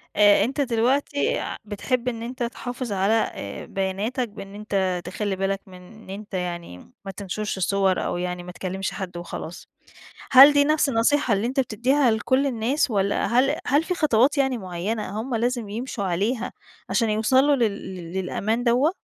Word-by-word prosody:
آآ، 205 0 +6
أنت 270 +5 -1
دلوقتي 280 - +1 0.2
بتحب 235 +4 -2
إن 235 -2 -2
أنت 245 +1 -4
تحافظ 245 0 -5
على 195 +2 +2 0.2
آآ، 100 0 -7
بياناتك 205 +6 -2
بإن 195 -1 -10
أنت 195 -4 -1
تخلِّي 195 +2 -2
بالك 195 +1 -1
من 185 - -13
إن 220 +3 -15
أنت 205 +2 -8
يعني 175 - -5
ما 195 - -4
تنشرش 200 +2 -4
الصور 190 0 +1
أو - - -2
يعني 180 0 -3
ما 180 - -8
تكلمش 190 +1 -4
حد 180 -3 -6
وخلاص. 175 -1 -7 0.6
هل 275 +2 +10
دي 285 0 +4
نفس 305 0 +2
النصيحة 245 0 +2
اللي 200 +3 0
أنت 265 +3 0
بتديها 255 +3 +2
لكل 260 +5 +1
الناس، 255 +3 0
والّا 200 -2 +1
هل 265 +5 +2
هل 290 +3 +3
في 360 - -1
خطوات 280 -3 +3
يعني 265 -3 +1
معينة 200 +3 -4
هُم 245 +2 -4
لازم 235 -1 -1
يمشوا 225 0 -4
عليها، 205 +7 -1 0.4
عشان 230 -3 +2
يوصلوا 260 +7 +3
لل 245 - 0 0.3
لل 170 -1 -8
للأمان 215 +5 -1
دوّة؟ 255 +7 +3
220 Hz, 165 wpm, -24 LUFS, 195-255 Hz, 0.6 s, هل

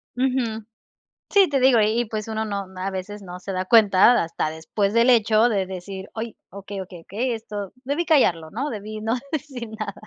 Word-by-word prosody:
Ujú. 245 -4 -1 0.7
Sí, 395 -3 +5
te 280 -2 +1
digo, 255 -3 +5
y 215 +3 +2
y, - - +1
pues, 215 0 -5
uno 220 0 -2
no 200 -2 -3
a 195 +1 -2
veces 195 +2 -6
no 180 -1 -9
se 195 - -5
da 185 0 -1
cuenta, 215 +1 +6
hasta 165 -1 -2
después 195 +6 -2
del 235 +2 +4
hecho 225 0 +4
de 195 -4 0
decir: 190 +1 -7
"Ay, 225 0 -5
okey, 200 0 -7
okey, 180 -2 -11
okey, 240 +8 -2
esto 210 -3 -6
debí 290 +6 -1
callarlo, 170 - +3
¿no? 275 +7 -3
Debí 215 0 -6
no 225 +2 0 0.2
decir 265 -6 -4
nada". 215 -2 -4
215 Hz, 195 wpm, -23 LUFS, 195-240 Hz, 0.7 s, cuenta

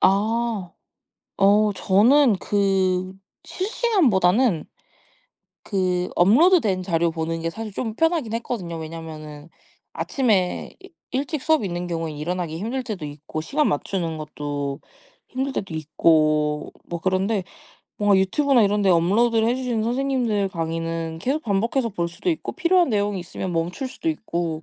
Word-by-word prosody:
아. 210 0 +1 0.6
어 205 +2 +4
저는 225 +6 +4
그 190 -2 +1 0.3
실시간보다는 255 - +2 1.0
그 180 -3 0
업로드된 215 - +4
자료 170 -2 +1
보는 165 0 -3
게 165 - -1
사실 220 +1 -6
좀 220 +2 -3
편하긴 325 -9 +1
했거든요. 225 -8 -4
왜냐면은 155 -2 -8 0.5
아침에 210 -9 0
이 380 - -14 0.2
일찍 280 +2 -2
수업이 310 -11 +2
있는 175 0 -4
경우에 165 -2 -3
일어나기 160 +2 -3
힘들 235 +8 -3
때도 210 -10 -5
있고 150 +2 -6
시간 295 - +1
맞추는 165 +1 -2
것도 145 -2 -4 0.5
힘들 265 +1 -3
때도 190 -8 -4
있고 155 -1 +2
뭐 170 - -4
그런데 190 +3 0 0.5
뭔가 205 -1 +3
유튜브나 240 +7 +3
이런데 205 -1 +2
업로드를 220 +7 +3
해 245 - +1
주시는 245 -4 -1
선생님들 240 -4 0
강의는 165 -1 -3
계속 280 - -1
반복해서 230 +4 0
볼 175 -5 -2
수도 175 - -2
있고 320 - -3
필요한 360 -1 +3
내용이 205 -3 0
있으면 180 +1 -5
멈출 175 +11 -2
수도 325 - -4
있고 170 - -3
195 Hz, 305 characters per minute, -23 LUFS, 165-240 Hz, 1.0 s, 어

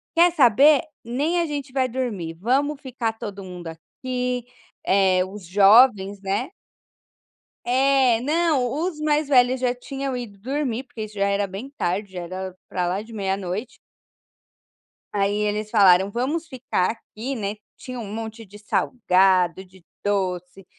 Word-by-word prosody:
"Quer 345 +1 +6
saber, 280 +1 +6 0.2
nem 285 +9 0
a - - 0
gente 285 -3 -5
vai 260 -2 +1
dormir, 215 -10 -3
vamos 270 - 0
ficar 245 -4 -3
todo 205 -3 -7
mundo 180 -2 -8
aqui, 250 +8 -4 0.4
eh, 190 -1 +3
os 190 -1 -10
jovens, 200 +1 +5
né." 200 +7 -2 1.2
É 260 -1 +3
não, 295 -2 +1
os 320 +2 -2
mais 300 -1 +1
velhos 255 -1 +4
já 250 -1 +2
tinham 270 +1 -5
ido 225 -5 -7
dormir 260 +2 -2
porque 230 -4 -8
isso 215 - -13
já 200 0 +1
era 200 0 0
bem 195 +8 -7
tarde, 200 -6 -3
já 180 -1 -6
era 185 +1 -6
para 180 -1 -2
lá 190 +3 -1
de 225 +2 -12
meia 195 -2 -1
noite. 200 +6 -5 1.3
Aí 200 0 0
eles 210 0 -1
falaram: 195 -3 +5
“Vamos 290 +9 -2
ficar 250 -9 -1
aqui!”, 230 +3 -7
né, 205 -3 -3 0.2
tinha 255 -1 -7
um 210 -3 -6
monte 225 0 -6
de 205 +1 -14
salgado, 190 -5 +2
de 185 -1 -20 0.2
doce, 185 -2 -2
225 Hz, 150 wpm, -23 LUFS, 195-260 Hz, 1.3 s, Quer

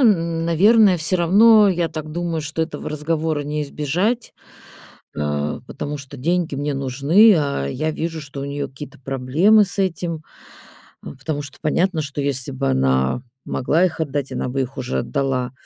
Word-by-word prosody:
н 170 -8 +2
наверное, 200 +4 +5
всё 170 +3 0
равно, 210 +4 +6
я 175 -2 0
так 155 -1 -6
думаю, 170 -1 -2
что 155 +2 -2
этого 160 - -5
разговора 155 0 -1
не 150 +1 -3
избежать, 175 - -1 0.8
э, 75 0 -2
потому 145 0 -5
что 140 0 -10
деньги 170 +2 0
мне 145 +1 -2
нужны, 140 - +4
а 140 - -1
я 155 - -2
вижу, 165 0 -4
что 140 -1 -8
у - - -3
неё 140 0 -4
какие-то 140 +2 -11
проблемы 140 - +3
с 200 - -7
этим, 170 -4 -1 0.8
а, - - -7
потому 145 +2 -4
что 145 - -10
понятно, 170 +2 +1
что 145 0 -5
если 140 -1 -2
бы 135 +1 -2
она 65 - +1 0.2
могла 155 +7 +1
их 170 -3 -1
отдать, 145 -3 -2
она - - -2
бы 135 +1 -1
их 130 +2 -7
уже 65 - -2
отдала. 135 -3 -2
150 Hz, 170 wpm, -21 LUFS, 135-170 Hz, 0.8 s, равно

